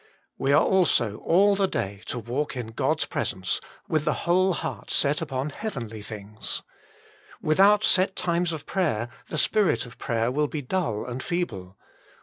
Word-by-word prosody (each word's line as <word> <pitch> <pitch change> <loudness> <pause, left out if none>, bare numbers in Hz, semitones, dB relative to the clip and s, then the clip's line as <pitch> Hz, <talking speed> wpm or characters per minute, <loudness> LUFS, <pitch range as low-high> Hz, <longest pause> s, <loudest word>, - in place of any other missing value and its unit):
We 135 - +1
are 150 - +6
also 125 - +3
all 200 +4 +4
the 195 -1 +2
day 100 - -3
to - - -2
walk 125 +5 -3
in 120 -3 -4
God 110 - 0
s - - +1
presence, 95 0 -2 0.3
with 155 -3 +1
the 150 - -1
whole 185 +2 +3
heart 160 -2 -5
set 145 +2 +2
upon 140 -2 -2
heavenly 120 - -5
things. 105 +1 -4 0.8
Without 200 +7 +4
set 190 -2 +3
times 175 0 0
of 155 -2 -6
prayer 120 - 0 0.2
the 155 - -3
spirit 185 - +2
of 120 - -14
prayer 115 +1 0
will 150 +3 +1
be 145 0 -4
dull 125 - -1
and 125 +1 -5
feeble. 100 - -3
145 Hz, 165 wpm, -26 LUFS, 115-180 Hz, 0.8 s, are